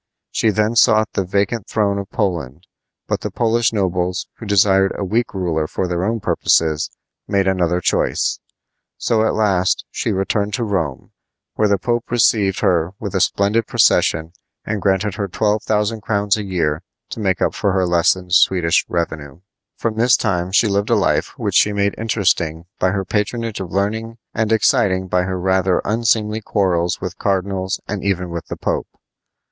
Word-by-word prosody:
She 110 - +1
then 110 +2 +1
sought 110 -2 +4
the 95 - 0
vacant 100 +4 -1
throne 100 -2 0
of 100 0 -7
Poland; 85 - -3 0.4
but - - -2
the - - -3
Polish 115 0 +1
nobles, 90 -3 -1
who 115 - -9
desired 95 -1 +4
a 100 - -2
weak 115 +5 0
ruler 80 -5 -1
for 95 - -2
their 90 0 -2
own 115 +3 0
purposes, 80 -6 +1 0.4
made 100 -1 +1
another 90 -2 +1
choice. - - 0 0.6
So 110 -2 +1
at - - -1
last 95 -4 +1
she - - -2
returned 100 +2 -1
to 120 - -2
Rome, 80 - -3 0.4
where 105 - +2
the 100 -1 +2
Pope 120 +4 -2
received 110 -5 +2
her 90 -2 +1
with 100 -2 -5
a 95 - +1
splendid 100 +4 +1
procession 80 +1 +2 0.3
and 105 -2 -3
granted 95 +1 +1
her 100 -2 -2
twelve 105 +3 0
thousand 105 +1 -1
crowns 100 -1 +1
a 110 - -3
year 85 -6 -1 0.3
to - - -6
make 95 -5 0
up - - +1
for 100 - 0
her 95 -1 +2
lessened 90 +1 +1
Swedish 90 -3 +4
revenue. 80 -3 -4 0.4
From 110 -1 -2
this 120 +2 +4
time 90 -4 -1
she 105 +3 +4
lived 100 0 0
a - - +4
life - - 0
which - - -2
she 105 - +4
made 100 0 +1
interesting 90 -7 0
by 95 - +2
her 95 0 -2
patronage 110 +2 -2
of 90 -3 -6
learning 110 +4 -2 0.2
and 110 -1 -1
exciting 95 -3 +2
by 90 0 +1
her 95 0 -3
rather 95 0 +1
unseemly 110 0 +1
quarrels 90 -4 0
with 90 -1 -6
cardinals 95 -1 -1
and 105 -2 -4
even 90 -3 -1
with 85 0 -6
the - - -6
Pope. - - -2
100 Hz, 175 wpm, -19 LUFS, 90-105 Hz, 0.6 s, sought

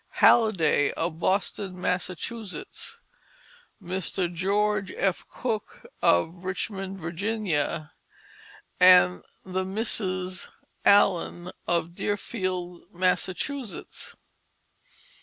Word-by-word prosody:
Halliday 180 -11 +5
of 165 0 -3
Boston, 190 0 -1
Massachusetts, 185 +4 -3 0.8
Mr. 180 -1 -2
George 200 +2 +1
F. 190 -2 +1
Cook 225 -4 -4 0.2
of 165 - +2
Richmond, 190 +1 -3
Virginia, 170 -3 -2 0.9
and 180 - +7 0.2
the 185 0 -2
Misses 185 -3 -1 0.4
Allen 180 -3 +4 0.2
of 170 -1 0
Deerfield, 185 -3 -3
Massachusetts. 190 +7 -2
185 Hz, 70 wpm, -27 LUFS, 175-200 Hz, 0.9 s, and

